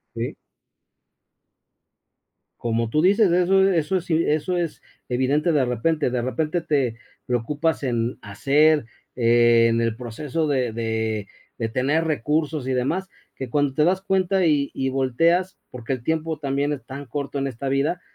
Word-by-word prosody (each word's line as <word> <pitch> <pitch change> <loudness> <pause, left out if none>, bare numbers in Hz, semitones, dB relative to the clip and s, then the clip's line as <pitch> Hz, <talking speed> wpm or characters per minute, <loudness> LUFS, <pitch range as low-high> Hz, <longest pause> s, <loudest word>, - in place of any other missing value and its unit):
Sí. - - -3 2.3
Como 115 -1 -1
tú 155 +6 +2
dices, 200 +2 +4
eso 190 +2 +4
eso 170 +2 +1
sí 165 -1 0
eso 155 +4 0
es 170 -3 -3 0.3
evidente 140 +6 +1
de 145 -4 +3
repente 130 +4 0
de 125 0 -1
repente 155 +7 -1
te 135 -8 0 0.3
preocupas 145 +8 -1
en 120 -2 -1
hacer, 145 +8 +2 0.3
en 115 -1 +4
el 115 -1 0
proceso 135 +6 -3
de 130 -5 0
de 110 -2 -2 0.3
de 115 - -2
tener 135 +8 +1
recursos 150 -1 -1
y 130 - -1
demás 160 +10 -1 0.3
que 130 - -5
cuando 145 +1 0
te 150 - +3
das 185 +3 +2
cuenta 190 -1 +1
y 145 -4 +2
y 135 - -1
volteas 165 +8 +1
porque 125 0 -5
el 130 -3 -3
tiempo 160 +2 -2
también 140 +1 -1
es 135 -5 -6
tan 140 +3 -8
corto 140 +1 -4
en 140 - -1
esta 135 +1 -4
vida 145 +6 0
140 Hz, 150 wpm, -23 LUFS, 125-160 Hz, 2.3 s, dices